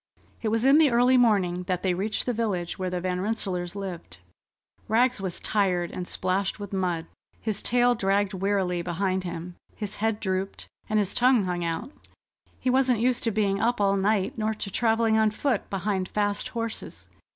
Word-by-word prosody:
It 225 Hz, -, -2 dB
was 225 Hz, +3 st, +1 dB
in 275 Hz, +3 st, +7 dB
the 310 Hz, -3 st, +6 dB
early 245 Hz, +2 st, +4 dB
morning 200 Hz, -8 st, +3 dB
that 180 Hz, -1 st, -1 dB
they 185 Hz, -2 st, +2 dB
reached 205 Hz, +4 st, -2 dB
the 245 Hz, -, 0 dB
village 200 Hz, -7 st, -2 dB
where 185 Hz, -1 st, -1 dB
the 180 Hz, 0 st, -2 dB
Van 180 Hz, 0 st, -2 dB
Rensselaers 190 Hz, -4 st, -2 dB
lived. 180 Hz, -, -6 dB, 0.7 s
Rags 240 Hz, 0 st, +2 dB
was 185 Hz, -3 st, -4 dB
tired 180 Hz, -5 st, 0 dB
and 180 Hz, -1 st, -5 dB
splashed 190 Hz, +2 st, -1 dB
with 205 Hz, -1 st, -7 dB
mud. 180 Hz, -4 st, -1 dB, 0.3 s
His 215 Hz, -2 st, -3 dB
tail 245 Hz, 0 st, +3 dB
dragged 200 Hz, -2 st, +1 dB
wearily 190 Hz, -2 st, 0 dB
behind 185 Hz, +2 st, -1 dB
him, 175 Hz, 0 st, -6 dB, 0.2 s
his 210 Hz, -1 st, -5 dB
head 220 Hz, 0 st, 0 dB
drooped, 190 Hz, 0 st, -3 dB, 0.2 s
and 215 Hz, -, +1 dB
his 205 Hz, -2 st, +1 dB
tongue 250 Hz, -3 st, +4 dB
hung 180 Hz, -1 st, -2 dB
out. 165 Hz, -, -3 dB, 0.7 s
He 255 Hz, -, +1 dB
wasn't 255 Hz, -3 st, +3 dB
used 245 Hz, +1 st, +2 dB
to -, -, +3 dB
being 200 Hz, -2 st, +1 dB
up 240 Hz, 0 st, +1 dB
all 200 Hz, -1 st, +3 dB
night, 200 Hz, +1 st, 0 dB
nor 215 Hz, 0 st, 0 dB
to 200 Hz, -2 st, -5 dB
travelling 225 Hz, 0 st, +2 dB
on 220 Hz, -1 st, +4 dB
foot 225 Hz, +1 st, -1 dB
behind 195 Hz, -1 st, -2 dB
fast 205 Hz, -1 st, -1 dB
horses. 230 Hz, -2 st, -5 dB
200 Hz, 185 wpm, -26 LUFS, 185-225 Hz, 0.7 s, in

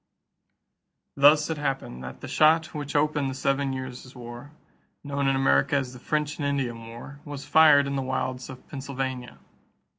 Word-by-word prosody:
= -, -, -55 dB, 0.3 s
Thus 150 Hz, +3 st, +5 dB
it 155 Hz, -, -3 dB
happened 135 Hz, -, -3 dB
that 65 Hz, 0 st, -9 dB
the -, -, -7 dB
shot 160 Hz, +1 st, +3 dB
which 145 Hz, -2 st, -5 dB
opened 145 Hz, -1 st, +1 dB
the 130 Hz, -, -5 dB
Seven 135 Hz, +1 st, 0 dB
Years' 130 Hz, 0 st, -7 dB
War, 120 Hz, +3 st, -9 dB, 0.5 s
known 140 Hz, -1 st, -1 dB
in 135 Hz, -, +3 dB
America 135 Hz, +1 st, +3 dB
as 130 Hz, -3 st, -1 dB
the 125 Hz, -, -11 dB
French 150 Hz, +3 st, -2 dB
and 145 Hz, -, 0 dB
Indian 120 Hz, -5 st, -2 dB
War, 120 Hz, +5 st, -10 dB
was 145 Hz, -2 st, -7 dB
fired 150 Hz, -3 st, +6 dB
in 140 Hz, 0 st, -3 dB
the 135 Hz, -, 0 dB
wilds 130 Hz, -1 st, -3 dB
of 130 Hz, -1 st, -11 dB
Pennsylvania. 130 Hz, -2 st, -5 dB
135 Hz, 175 wpm, -26 LUFS, 130-145 Hz, 0.5 s, fired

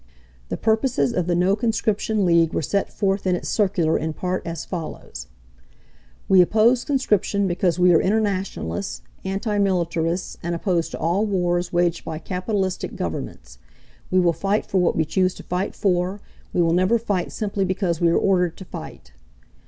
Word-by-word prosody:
The -, -, -2 dB
purposes 230 Hz, +2 st, +1 dB
of 180 Hz, -4 st, -1 dB
the 175 Hz, -, +1 dB
No 180 Hz, +3 st, +3 dB
conscription 215 Hz, -2 st, 0 dB
League 170 Hz, -2 st, +3 dB
were -, -, 0 dB
set 200 Hz, +6 st, -1 dB
forth 195 Hz, -1 st, -1 dB
in 180 Hz, -, +3 dB
its -, -, -4 dB
circular 185 Hz, -6 st, +1 dB
in 160 Hz, 0 st, -3 dB
part 180 Hz, +3 st, -2 dB
as 165 Hz, -1 st, -4 dB
follows: 155 Hz, -, -7 dB, 1.0 s
"We 190 Hz, -1 st, +7 dB
oppose 225 Hz, +7 st, +3 dB
conscription 210 Hz, -7 st, +1 dB
because 175 Hz, -2 st, +1 dB
we 180 Hz, 0 st, +5 dB
are 160 Hz, -, +5 dB
internationalists, 190 Hz, -, -1 dB, 0.2 s
anti 205 Hz, +2 st, -1 dB
militarists, 175 Hz, -2 st, 0 dB
and 170 Hz, 0 st, -2 dB
opposed 170 Hz, -1 st, 0 dB
to -, -, -3 dB
all 180 Hz, +7 st, +1 dB
wars 175 Hz, -3 st, 0 dB
waged 175 Hz, -1 st, +1 dB
by 160 Hz, -1 st, -5 dB
capitalistic 185 Hz, +3 st, -2 dB
Governments. -, -, -6 dB, 0.5 s
We 185 Hz, -, +3 dB
will 175 Hz, -2 st, +3 dB
fight 200 Hz, +5 st, 0 dB
for 190 Hz, -, 0 dB
what 180 Hz, -, +2 dB
we 160 Hz, -, +1 dB
choose 185 Hz, +3 st, +1 dB
to -, -, -10 dB
fight 180 Hz, +3 st, -2 dB
for, 185 Hz, +1 st, 0 dB, 0.3 s
we 175 Hz, -, +2 dB
will 165 Hz, 0 st, +2 dB
never 185 Hz, +6 st, +3 dB
fight 205 Hz, -6 st, -2 dB
simply 200 Hz, -2 st, -2 dB
because 185 Hz, -3 st, -1 dB
we 170 Hz, -, +4 dB
are 165 Hz, -, +3 dB
ordered 180 Hz, -3 st, +1 dB
to 190 Hz, -, -9 dB
fight. 70 Hz, -, -9 dB
185 Hz, 170 wpm, -23 LUFS, 170-200 Hz, 1.0 s, We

